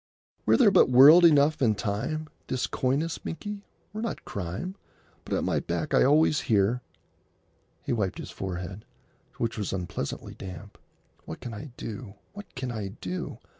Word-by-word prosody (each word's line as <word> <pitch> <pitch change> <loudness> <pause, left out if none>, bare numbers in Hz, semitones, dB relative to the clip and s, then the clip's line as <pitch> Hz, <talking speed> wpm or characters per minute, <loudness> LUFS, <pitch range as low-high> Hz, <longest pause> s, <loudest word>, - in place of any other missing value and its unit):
""Were - - +5
there 230 -6 +6
but - - +5
world 140 +8 +9
enough 150 -2 +5
and 110 -5 +3
time, 125 +10 -2 0.2
This 130 -2 -1
coyness, 140 +6 -1
Binkie, 205 +4 -6 0.3
were 215 - -4
not 230 - -4
crime.... 100 - -4 0.5
But - - -2
at - - 0
my - - +1
back - - -3
I - - +5
always 150 0 +4
hear——"' 110 +3 +3 1.0
He - - -1
wiped 100 -5 -1
his - - -7
forehead, 95 +2 -5 0.5
which 115 -1 -2
was 105 - -2
unpleasantly 90 -6 -4
damp. 95 +1 -10 0.5
"What 80 - -7
can 120 - -7
I 140 +8 -7
do? 110 -2 -7 0.2
What 205 -4 -11
can 130 -1 -4
I 110 -4 -4
do? 90 0 -5
120 Hz, 160 wpm, -27 LUFS, 100-155 Hz, 1.0 s, world